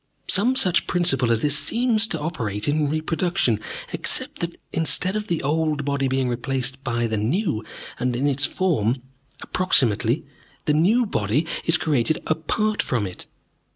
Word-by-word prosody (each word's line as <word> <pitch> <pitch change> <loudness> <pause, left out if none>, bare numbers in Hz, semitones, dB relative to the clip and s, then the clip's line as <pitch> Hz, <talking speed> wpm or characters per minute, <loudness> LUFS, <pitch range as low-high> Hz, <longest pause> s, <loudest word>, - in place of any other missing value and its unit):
Some 235 +7 +3
such 185 -9 +2
principle 135 -9 +1
as 115 -1 +1
this 145 -1 +3
seems 230 - +2
to 165 - -2
operate 115 - -2
in 150 0 +1
reproduction, 155 - 0 0.3
except - - -2
that, 170 0 -3 0.2
instead 175 +4 +1
of 215 0 -2
the 170 -3 -1
old 150 0 0
body 140 -1 0
being 130 0 0
replaced 130 +2 -1
by 120 -3 0
the 110 -1 -1
new, 120 - 0 0.4
and 125 0 0
in 130 +4 0
its 140 0 +1
form, 130 - 0 0.4
approximately, 130 - +2 0.4
the 150 - +2
new 205 +11 +3
body 125 - 0 0.2
is 165 -1 +5
created 150 -1 +1
apart 210 +7 0
from 120 -5 -1
it. 90 -2 -8
150 Hz, 155 wpm, -23 LUFS, 125-175 Hz, 0.4 s, is